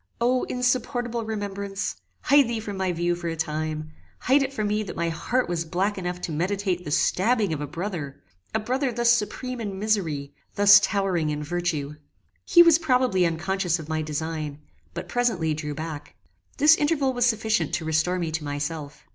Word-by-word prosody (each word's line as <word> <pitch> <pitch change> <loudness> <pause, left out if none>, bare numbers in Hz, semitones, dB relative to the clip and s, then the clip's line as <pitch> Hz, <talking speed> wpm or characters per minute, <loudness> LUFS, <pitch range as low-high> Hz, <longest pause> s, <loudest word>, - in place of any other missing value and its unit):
O, 250 +2 +2
insupportable 245 -1 -1
remembrance! 200 -2 -4 0.2
hide 285 -3 +5
thee 235 -1 -2
from 210 -2 -6
my 190 -1 0
view 175 0 0
for 175 0 -5
a 165 - -2
time; 155 -1 -3 0.3
hide 275 +3 +4
it 270 0 -1
from 215 -6 -2
me 210 +1 0
that 205 - -6
my 170 0 -1
heart 245 +10 -1
was 170 -1 -1
black 185 +5 -1
enough 180 -1 -4
to 170 - -4
meditate 180 +2 -1
the 150 - -6
stabbing 205 +5 +2
of 150 - -4
a 145 - -3
brother! 165 -3 -5 0.4
a - - +3
brother 255 +4 -1
thus 235 0 +3
supreme 240 +2 -1
in 200 -3 -4
misery; 175 -10 -1 0.2
thus 200 0 +8
towering 195 -6 0
in 150 0 -3
virtue! 155 -3 -2 0.5
He 345 - +7
was 335 -1 +6
probably 250 - +2
unconscious 180 +1 -1
of 160 -2 -9
my 155 0 -1
design, 155 -1 -4 0.3
but - - -5
presently 205 -11 0
drew 150 -1 -4
back. 155 -1 -7 0.4
This 305 +2 +7
interval 290 -3 +1
was 245 -1 +2
sufficient 220 -8 +1
to 170 -2 -4
restore 160 +3 +1
me 170 -3 -2
to 160 -1 -3
myself. 145 +1 -5
185 Hz, 180 wpm, -25 LUFS, 160-230 Hz, 0.5 s, thus